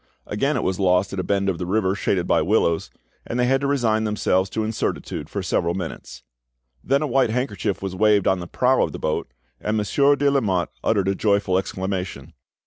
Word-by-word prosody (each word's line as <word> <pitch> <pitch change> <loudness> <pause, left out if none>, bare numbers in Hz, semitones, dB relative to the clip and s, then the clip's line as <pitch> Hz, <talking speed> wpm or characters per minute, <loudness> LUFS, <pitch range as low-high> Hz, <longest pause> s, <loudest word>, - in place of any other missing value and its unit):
Again 135 +9 0
it - - -1
was 95 0 -1
lost 95 0 +2
at 100 - -3
a - - -1
bend 100 0 0
of 95 -3 -1
the 90 - -3
river 95 -1 +1
shaded 95 -3 0
by - - +2
willows, 85 -2 +1 0.3
and 120 - -4
they 125 - +3
had 135 +2 +2
to 140 - 0
resign 115 -6 +1
themselves 100 -3 +1
to 110 +3 -2
incertitude 110 0 -3
for - - -4
several 85 +1 0
minutes. 85 -7 -7 0.6
Then 140 +3 +1
a - - +1
white 130 -2 +2
handkerchief 105 -6 -2
was 95 -1 -4
waved 105 0 +3
on 95 - +2
the 85 - -6
prow 130 +7 +2
of - - 0
the - - -5
boat, 75 -5 -2 0.3
and 105 +1 -1
Monsieur 140 +7 +3
de 140 0 +2
Lamotte 100 -10 0
uttered 100 -4 +1
a 95 - +2
joyful 100 -2 +1
exclamation. 95 -5 -3
100 Hz, 210 wpm, -23 LUFS, 95-115 Hz, 0.6 s, they